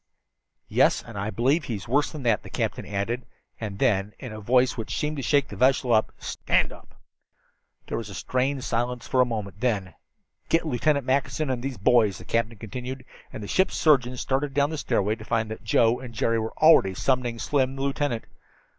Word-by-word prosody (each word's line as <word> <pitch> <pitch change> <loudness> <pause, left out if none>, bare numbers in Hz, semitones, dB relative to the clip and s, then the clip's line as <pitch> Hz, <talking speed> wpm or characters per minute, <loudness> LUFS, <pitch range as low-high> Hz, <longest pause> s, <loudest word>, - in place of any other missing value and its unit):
"Yes, - - +3
and 115 - -11
I 100 +1 -2
believe 135 +8 +1
he's 115 -1 -5
worse 145 +5 +2
than 150 -3 -7
that," 115 -4 +2
the - - -11
captain - - -3
added; 110 +5 -3 0.3
and 105 -3 -5
then, 105 -5 +1
in 125 -4 -8
a 110 - -7
voice 125 +4 +3
which 115 -3 -4
seemed 150 0 -2
to - - -2
shake 140 +1 +2
the - - -7
vessel: 130 -2 +3 0.2
"Stand - - 0
up!" - - -17 0.9
There - - -3
was 110 -2 -7
a 100 - -8
strained 130 +3 -1
silence 120 +1 -2
for 130 - +3
a - - +5
moment. 105 -4 -5
Then 105 -7 -1 0.6
"Get 165 - +2
Lieutenant 140 0 +1
Mackinson 135 +2 0
and 125 -1 -3
those 135 -2 -4
boys," 110 -2 +3
the - - -12
captain 115 -1 -1
continued, 125 +5 -7 0.3
and 110 - -7
the - - -6
ship's 190 - +1
surgeon 130 -5 +3
started 135 +3 -1
down 145 +1 +2
the 160 - -3
stairway 105 -6 +1
to 110 0 -8
find 110 -1 -1
that 110 - -7
Joe 115 +1 +3
and 125 -3 -9
Jerry 115 +1 +1
already 110 +1 +4
were 95 - -7
summoning 125 0 0
Slim 130 +2 +1
and 135 - -9
the 135 - -3
lieutenant. 140 -4 -1
125 Hz, 200 wpm, -25 LUFS, 110-135 Hz, 0.9 s, a